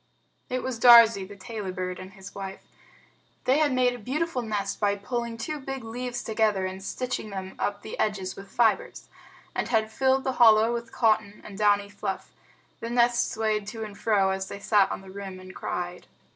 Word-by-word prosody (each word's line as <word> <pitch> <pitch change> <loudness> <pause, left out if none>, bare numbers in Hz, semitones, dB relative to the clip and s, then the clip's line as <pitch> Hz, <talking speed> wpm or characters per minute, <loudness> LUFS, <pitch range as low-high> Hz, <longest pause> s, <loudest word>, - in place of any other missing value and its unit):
It 255 0 -2
was 255 -3 -3
Darzee, 230 -5 +8
the 205 - -11
Tailorbird, 185 -4 -5
and 185 +1 -10
his 195 -1 -11
wife. 195 -1 -7 0.8
They 265 +4 +3
had 300 -2 +3
made 250 -1 +3
a 245 - -8
beautiful 270 +4 -2
nest 205 -3 -3
by 205 -1 +2
pulling 235 +3 -4
two 300 +6 -4
big 270 -2 -5
leaves 245 +2 -4
together 215 -3 +1
and 190 +1 -5
stitching 255 +1 -3
them 190 -1 -6
up 200 0 -2
the - - -7
edges 195 -3 -1
with 195 0 -11
fibers, 240 - +1 0.4
and - - -2
had 220 -2 +1
filled 265 +3 +2
the 265 - 0
hollow 220 0 +7
with 235 -1 -5
cotton 215 -3 +1
and 205 - -9
downy 205 0 +3
fluff. 200 -1 -5 0.5
The 230 - -5
nest 240 0 +2
swayed 215 -2 -1
to 225 +1 -5
and 210 -2 -8
fro, 200 -2 +2
as 190 0 -3
they 200 - -7
sat 205 -1 +3
on - - -4
the 190 -1 -12
rim 195 -1 -7
and 185 0 -11
cried. 180 0 -5
215 Hz, 190 wpm, -27 LUFS, 195-240 Hz, 0.8 s, Darzee